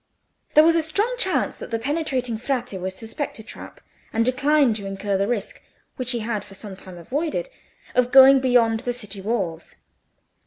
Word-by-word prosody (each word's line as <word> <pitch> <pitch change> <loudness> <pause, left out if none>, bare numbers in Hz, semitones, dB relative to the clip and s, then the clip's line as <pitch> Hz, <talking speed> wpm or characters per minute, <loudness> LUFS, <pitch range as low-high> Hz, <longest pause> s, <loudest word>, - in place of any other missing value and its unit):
There 305 - +8
was 330 +1 +5
a 330 - +2
strong 400 +10 0
chance - - +1
that - - -8
the 230 - -1
penetrating 255 -3 -2
Frate 250 -2 -2
would 190 0 -4
suspect 225 +8 -5
a 220 - -9
trap, 225 - -11 0.3
and 230 +1 +1
decline 275 0 +3
to 205 -2 -5
incur 195 +1 -2
the 195 +1 +1
risk, 225 -4 -3 0.3
which 255 -2 -4
he 240 -3 0
had 215 -2 -3
for 195 - -12
some 195 0 -8
time 185 -1 -12
avoided, 310 - -3 0.4
of 250 0 +2
going 270 0 +8
beyond 240 -3 +3
the 245 +1 -3
city 210 -5 -8
walls. 190 -6 -3
240 Hz, 185 wpm, -23 LUFS, 205-275 Hz, 0.4 s, There